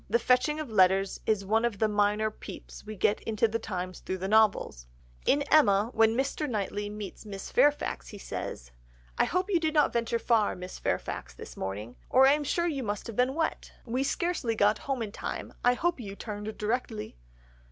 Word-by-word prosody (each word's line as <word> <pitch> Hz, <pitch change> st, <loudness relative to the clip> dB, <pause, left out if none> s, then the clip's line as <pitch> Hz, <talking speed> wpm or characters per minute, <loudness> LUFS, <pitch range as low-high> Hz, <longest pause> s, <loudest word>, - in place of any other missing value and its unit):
The -, -, +4 dB
fetching 255 Hz, +6 st, +2 dB
of 300 Hz, -7 st, -5 dB
letters 190 Hz, -1 st, +3 dB
is 210 Hz, -3 st, +1 dB
one 220 Hz, +3 st, +2 dB
of 235 Hz, -4 st, 0 dB
the 220 Hz, -, +2 dB
minor 210 Hz, +1 st, +1 dB
peeps -, -, -10 dB
we 215 Hz, 0 st, -7 dB
get 210 Hz, +1 st, +1 dB
into 225 Hz, 0 st, +1 dB
the 225 Hz, +1 st, -2 dB
times 185 Hz, -3 st, -5 dB
through 190 Hz, -, -4 dB
the 190 Hz, +1 st, -3 dB
novels. 205 Hz, -, +2 dB, 0.4 s
In 285 Hz, +1 st, +4 dB
Emma, 230 Hz, -8 st, +4 dB
when 225 Hz, +1 st, +4 dB
Mr. 275 Hz, +2 st, -1 dB
Knightley 205 Hz, -2 st, -2 dB
meets 210 Hz, -2 st, -7 dB
Miss 200 Hz, -2 st, -7 dB
Fairfax 290 Hz, +3 st, +2 dB
he 210 Hz, -, -9 dB
says— 60 Hz, -, -6 dB, 0.5 s
"'I -, -, +5 dB
hope 365 Hz, +3 st, -1 dB
you 350 Hz, -, +4 dB
did 315 Hz, -1 st, -1 dB
not 300 Hz, -, +4 dB
venture 235 Hz, 0 st, 0 dB
far, 230 Hz, -3 st, +2 dB
Miss 180 Hz, 0 st, -8 dB
Fairfax, -, -, -3 dB
this -, -, -10 dB
morning, 105 Hz, +5 st, -5 dB
or 260 Hz, +1 st, +6 dB
I 275 Hz, -, +7 dB
am 300 Hz, 0 st, 0 dB
sure 340 Hz, +5 st, 0 dB
you 295 Hz, -6 st, -1 dB
must 205 Hz, -4 st, -3 dB
have 230 Hz, -, -7 dB
been 255 Hz, +3 st, +2 dB
wet. 325 Hz, 0 st, -2 dB
We 250 Hz, +2 st, -1 dB
scarcely 295 Hz, -6 st, -1 dB
got 210 Hz, 0 st, +3 dB
home 260 Hz, -4 st, 0 dB
in 210 Hz, -, -5 dB
time. -, -, -5 dB
I 245 Hz, 0 st, +4 dB
hope 345 Hz, +2 st, 0 dB
you 200 Hz, -4 st, -7 dB
turned 210 Hz, 0 st, -6 dB
directly! 210 Hz, -, -3 dB
220 Hz, 200 wpm, -29 LUFS, 200-260 Hz, 0.5 s, I